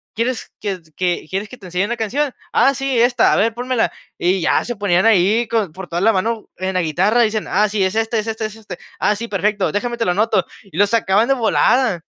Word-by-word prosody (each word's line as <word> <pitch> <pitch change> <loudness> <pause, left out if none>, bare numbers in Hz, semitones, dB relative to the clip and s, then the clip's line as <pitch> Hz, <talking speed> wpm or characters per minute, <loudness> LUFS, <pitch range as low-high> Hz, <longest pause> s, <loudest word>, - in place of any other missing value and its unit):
¿quieres 235 +2 -2
que 200 -3 -3 0.2
que 180 -3 -1
quieres 195 +3 -3
que 255 - -11
te 195 - -14
enseñe 180 +2 -1
una 235 +3 -3
canción?". 260 +6 -1 0.2
"Ah, 270 +3 +4
sí, 270 -2 -1
esta, 245 +1 +4
a - - +3
ver, 225 +2 +2
pónmela". 245 0 -1 0.3
Y 185 +2 +1
ya - - +2
se 240 - -4
ponían 195 -1 +2
ahí, 220 +2 +3
con 210 -8 -1
por 190 0 -8
toda 170 +1 -2
la 225 +3 +4
mano 220 +3 -1
en 190 +1 -3
la 185 - +2
guitarra, 185 +9 +2
dicen: 215 -2 0
"Ah, 210 +3 +2
sí, 205 -1 -1
es 190 +2 -1
este 225 0 0
es 215 - -4
este, 220 0 -3
es 215 0 -6
este. 210 -5 -9 0.2
Ah, 210 - +2
sí, 230 +3 -5
perfecto. 205 -1 0
Déjame 235 +3 -2
te 230 - -1
lo 180 - +2
anoto". 215 +5 +1 0.2
Y 195 -5 -12
lo 205 +1 +4
sacaban 220 0 +2
de 270 - +3
volada. 240 -4 +2
215 Hz, 240 wpm, -19 LUFS, 190-235 Hz, 0.3 s, Ah